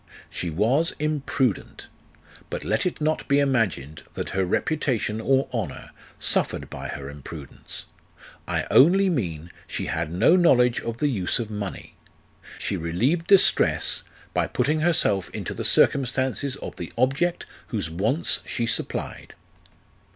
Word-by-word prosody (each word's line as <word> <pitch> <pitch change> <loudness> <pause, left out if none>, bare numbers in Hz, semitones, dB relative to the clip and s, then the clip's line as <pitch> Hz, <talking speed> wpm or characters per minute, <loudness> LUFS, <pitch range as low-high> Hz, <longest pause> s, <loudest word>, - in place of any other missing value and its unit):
She 90 - -3
was 120 - +2
imprudent. 140 - -1 0.6
But - - -4
let 110 - 0
it 180 - -4
not 155 +1 -1
be 140 - +3
imagined 110 - 0
that - - -4
her 95 - 0
reputation 115 - -1
or 135 +3 +2
honour 115 -3 -4 0.3
suffered - - 0
by - - -6
her 70 - -6
imprudence: 70 0 -8 0.6
I - - -1
only 190 +8 +6
mean, 85 - -3 0.2
she - - -4
had 75 - -2
no 110 - +4
knowledge 125 -9 +4
of 115 0 -4
the 150 - +1
use 100 -10 +1
of 115 -3 -4
money; 105 -2 -6 0.6
she - - -2
relieved 120 - 0
distress 195 -2 +4 0.3
by - - +1
putting 150 +5 0
herself 150 - +2
into - - -4
the - - -5
circumstances 130 0 +2
of - - -8
the 85 - -6
object 135 +8 +1 0.2
whose 95 -8 -3
wants 110 - +1
she 120 - -2
supplied. 115 - -3
125 Hz, 135 wpm, -24 LUFS, 95-145 Hz, 0.6 s, only